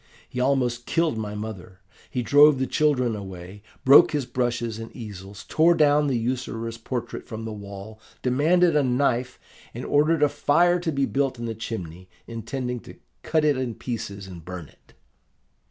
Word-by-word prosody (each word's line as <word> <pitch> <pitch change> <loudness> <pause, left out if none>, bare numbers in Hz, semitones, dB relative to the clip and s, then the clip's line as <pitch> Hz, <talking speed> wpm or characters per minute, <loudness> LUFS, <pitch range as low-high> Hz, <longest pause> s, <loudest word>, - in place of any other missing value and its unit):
He 125 - -6
almost 125 -2 +1
killed 165 -4 +1
my 105 -1 -4
mother, 105 -3 -7 0.3
he 125 - -2
drove 145 +3 +6
the 130 - 0
children 130 -6 +1
away, 95 0 -9 0.2
broke 140 +3 +8
his 145 -3 0
brushes 120 -2 -2
and 115 - -8
easels, 100 -3 -9
tore 165 +2 +4
down 150 -1 +4
the 130 -3 +1
usurer's 115 -1 -3
portrait 120 0 -5
from 110 -1 -6
the 110 - -5
wall, 100 +1 -9 0.2
demanded 160 +7 +3
a 150 - +5
knife, 125 -1 0 0.4
and - - -5
ordered 150 +1 +3
a - - +6
fire 170 +5 +3
to 170 -2 -2
be 140 -2 +1
built 135 -1 -1
in 120 - -5
the 115 - -3
chimney, 95 -5 -7 0.2
intending 125 +2 -4
to - - -13 0.3
cut 155 -1 +1
it 150 -2 +4
in 125 -3 -3
pieces 100 -5 -5
and 90 -3 -10
burn 90 -3 -8
it. - - -26
125 Hz, 170 wpm, -25 LUFS, 110-145 Hz, 0.4 s, broke